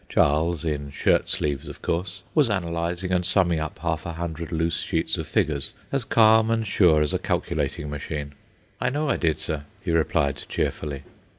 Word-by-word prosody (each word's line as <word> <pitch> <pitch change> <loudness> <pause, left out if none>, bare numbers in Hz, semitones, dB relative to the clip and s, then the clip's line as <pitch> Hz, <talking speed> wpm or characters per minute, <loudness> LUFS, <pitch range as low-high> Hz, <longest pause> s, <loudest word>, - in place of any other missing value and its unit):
Charles, 80 +3 +2
in 70 -2 -2
shirt 70 - +2
sleeves 70 -2 -1
of - - -10
course, 90 +2 -2
was 150 -6 +4
analyzing 85 -1 -1
and 90 -1 +2
summing 90 -2 +2
up 80 0 -4
half 80 -2 -2
a 85 - -5
hundred 85 0 -5
loose 85 0 0
sheets - - 0
of - - -4
figures, 70 -3 0 0.2
as 135 -4 -1
calm 110 0 +5
and 115 -1 +1
sure 85 -6 +4
as 75 - -1
a - - +1
calculating 75 - -1
machine. 75 0 -5 0.5
"I 125 - +2
know 150 +4 -1
I - - +1
did, 80 -3 +1
sir," 75 -2 -3 0.2
he - - -1
replied, 75 -4 +2
cheerfully. 70 -3 -2
85 Hz, 180 wpm, -25 LUFS, 75-90 Hz, 0.5 s, calm